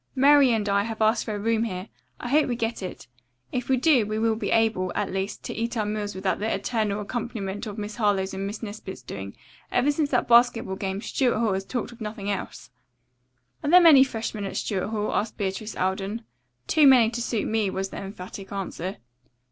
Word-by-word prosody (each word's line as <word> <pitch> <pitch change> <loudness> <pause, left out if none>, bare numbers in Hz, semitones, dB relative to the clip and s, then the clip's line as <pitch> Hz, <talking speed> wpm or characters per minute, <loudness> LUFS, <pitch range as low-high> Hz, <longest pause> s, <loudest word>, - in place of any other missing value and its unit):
"Mary 280 0 +6
and 215 -3 0
I 200 0 +3
have 225 -1 -5
asked 220 +1 +2
for 215 - -3
a - - -4
room 225 +1 +1
here. 185 -2 -5 0.3
I 245 - -5
hope 300 +3 +4
we 245 - -1
get 230 -1 -2
it. 185 -8 -7 0.5
If 250 0 -3
we 260 - +4
do 270 -3 +4
we 215 +1 -3
will 225 0 +2
be 220 - -3
able, 220 -5 +2
at 205 - -1
least, 195 +1 -3
to - - -5
eat 230 +1 -3
our 215 - 0
meals 210 -1 -3
without 190 0 -1
the 220 +2 -1
eternal 215 -3 -1
accompaniment 210 -2 -4
of 210 0 -6
Miss 210 0 -5
Harlowe's 200 -4 +1
and 195 +1 -3
Miss 210 +3 -6
Nesbit's 205 -3 -7
doings. 100 0 -7 0.4
Ever 260 +4 +3
since 295 0 0
that 250 - +1
basketball 235 -4 +4
game, 195 0 -3
Stuart 250 -5 +1
Hall 220 -3 +1
has 190 0 -2
talked 245 +2 -3
of 240 0 -15
nothing 210 -1 -4
else." 195 - -6 0.9
"Are 290 - 0
there 360 +3 +9
many 315 -6 +8
freshmen 225 -4 -4
at 195 - -4
Stuart 195 -2 -1
Hall?" 210 -1 -2
asked 215 +1 -1
Beatrice 200 +2 -3
Alden. 195 +4 -2 0.4
"Too 300 - +5
many 245 -4 +6
to 240 0 -3
suit 230 -2 -1
me," 220 -3 +1
was 190 +1 -3
the - - -8
emphatic 195 0 -8
answer. 190 -1 -4
215 Hz, 210 wpm, -25 LUFS, 195-235 Hz, 0.9 s, there